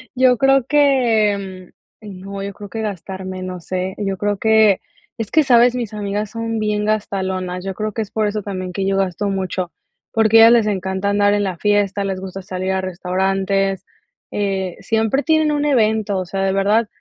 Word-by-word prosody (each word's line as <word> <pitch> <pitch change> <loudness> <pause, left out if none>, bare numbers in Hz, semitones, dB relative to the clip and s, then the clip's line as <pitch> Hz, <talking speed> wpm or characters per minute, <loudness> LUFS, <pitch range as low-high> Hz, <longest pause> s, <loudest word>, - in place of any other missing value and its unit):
Yo 250 -1 +4
creo 270 -1 +3
que 215 -10 +1
mm - - -47 0.3
eh 210 - -11
no, 195 +2 -7
yo 200 0 -5
creo 205 0 -10
que 225 - -5
gastar 190 -2 -5
menos 185 -2 -7
éh. 185 +1 -1
Yo 195 -2 -2
creo 205 0 -1
que 220 -2 +4 0.4
es 225 -3 -5
que, 310 -1 +4
¿sabes?, 245 -1 +5
mis 230 -4 -4
amigas 205 0 -3
son 230 0 -3
bien 210 -1 -1
gastalonas, 190 -3 -2
yo 195 - -3
creo 215 +2 -3
que 225 - -3
es 205 - -5
por 215 -1 -1
eso 210 0 -1
también 185 -2 -5
que 190 +1 -2
yo 195 - +1
gasto 195 +1 -1
mucho, 185 -2 -3 0.4
porque 225 0 +4
a 225 - +10
ellas 235 - +7
les 225 -3 +3
encanta 190 0 -1
andar 205 0 +3
en 205 0 +1
la 185 -3 -3
fiesta, 205 0 +1
les 190 -1 -3
gusta 190 0 -7
salir 185 +1 -3
a 190 - 0
restaurantes, 190 +1 -1 0.5
eh, 195 -3 -2
siempre 225 +5 0
tienen 315 -2 +2
un 295 0 0
evento, 220 -6 +1
o 185 - -3
sea, 195 +2 -3
de 190 - +1
verdad 205 +3 +2
200 Hz, 200 wpm, -19 LUFS, 190-220 Hz, 0.5 s, a